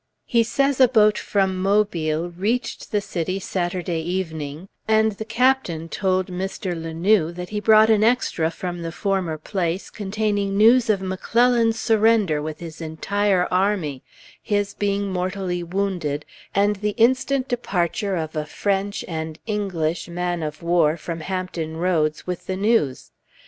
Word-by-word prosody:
He 235 -2 +3
says 275 +4 +1
a 260 - +8
boat 215 -3 +4
from 190 -2 0
Mobile 175 -5 +1
reached 210 +8 -2
the 210 -2 +1
city 185 -1 -3
Saturday 175 -2 -2
evening, 160 -2 -4 0.2
and 220 0 +4
the 215 +2 -7
captain 225 -9 +1
told 185 0 0
Mr. 185 0 -4
La 165 0 -5
Noue 170 0 +2
that 180 +1 -7
he 210 - -2
brought 220 +1 +6
an 215 -1 +4
extra 225 -8 +2
from 175 +1 -5
the 165 0 -4
former 185 -4 -1
place, 175 +2 -3
containing 205 -1 -1
news 230 +3 +5
of 200 -3 +2
McClellan's 230 +4 +2
surrender 220 -8 +3
with 155 +1 -6
his 165 -1 -8
entire 185 +4 0
army, 180 -8 0 0.4
his 205 -2 -1
being 200 -1 -1
mortally 185 -1 -2
wounded, 175 -5 -2 0.3
and 205 +1 +3
the 210 +1 -2
instant 260 +3 +2
departure 200 -4 -1
of 160 -2 -4
a 155 -1 -2
French, 200 +4 -1
and 160 -2 -4
English, 175 -7 -2
man 175 0 -2
of 155 +1 -5
war, 170 -2 +3
from 165 0 -5
Hampton 175 -3 -4
Roads, 165 -3 0
with 180 -1 -5
the 190 - -2
news. 200 - +1
190 Hz, 150 wpm, -22 LUFS, 170-210 Hz, 0.4 s, a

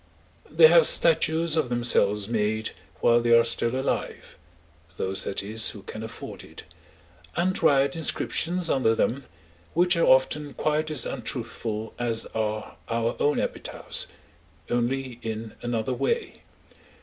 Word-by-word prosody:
They - - +6
have - - +7
statues 170 - +3
of 155 -6 0
themselves 105 -4 +2
made 110 -1 -1 0.3
while 120 0 +4
they 115 0 +5
are 115 - +5
still 115 +2 +1
alive 135 - -4 0.6
(those, 95 0 -1
that 100 - -3
is, 110 +2 +2
who 100 - -9
can 110 - -8
afford 110 0 -9
it), - - -12 0.7
and 185 +2 0
write 140 -3 +3
inscriptions 170 +2 0
under 130 -7 +2
them, 130 +4 -1 0.5
which 175 +2 +4
are 170 - +2
often 135 +2 +2
quite 155 +1 -1
as 150 -6 0
untruthful 115 -3 -5
as 115 -2 0
are 110 -1 -3
our 115 0 -1
own 145 - +1
epitaphs—only 120 - -4
in 110 0 -6
another 120 0 -2
way. 465 - -2
120 Hz, 130 wpm, -25 LUFS, 110-150 Hz, 0.7 s, have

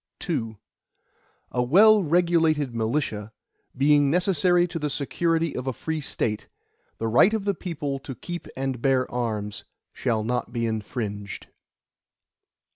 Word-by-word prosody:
II 110 -1 -2 0.9
A 125 - 0
well 205 - +6
regulated 165 -5 +2
militia, 110 -2 -2 0.5
being 145 +1 +4
necessary 175 +1 +3
to 165 -1 -5
the 150 -1 -1
security 165 +3 0
of 130 +1 -4
a 130 - 0
free 160 +5 -3
State, 105 -6 -2 0.5
the 115 - -2
right 150 - +5
of 210 -3 -3
the 200 - +2
people 150 -7 -4
to 135 -1 -8
keep 175 +5 -7
and 135 -2 -2
bear 130 -1 +2
arms, 105 -4 -3 0.3
shall 115 -4 -1
not 125 +1 -2
be 115 -1 -1
infringed. 105 -2 -4
135 Hz, 130 wpm, -25 LUFS, 115-165 Hz, 0.9 s, well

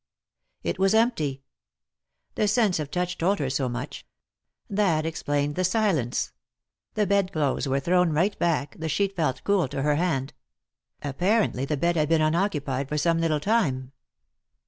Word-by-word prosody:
It - - -2
was 195 +2 +3
empty; 155 - +1 0.9
the 210 - +1
sense 210 -5 +2
of 150 -2 -4
touch 180 +2 -2
told 195 +5 +2
her 135 -3 -2
so 135 -1 0
much. 120 +1 -6 0.6
That 190 -6 +1
explained 145 -2 -1
the 185 - -1
silence. 185 - 0 0.6
The 210 - +2
bed 200 -2 +1
clotbes 145 -4 0
were 135 +1 +1
thrown 180 +4 +2
right 170 +7 +1
back, 155 -4 0
the 160 0 -3
sheet 195 +6 0
felt 150 -7 -1
cool 200 -6 +2
to 135 +1 -3
her 150 0 +2
hand; 150 -6 -1 0.7
apparently 175 - +1
the 150 +1 -1
bed 170 +4 +1
had 155 -1 +1
been 165 -1 +4
unoccupied 155 -5 0
for 150 - -1
some 165 +2 +2
little 155 -2 +1
time. 140 - 0
160 Hz, 160 wpm, -26 LUFS, 140-195 Hz, 0.9 s, been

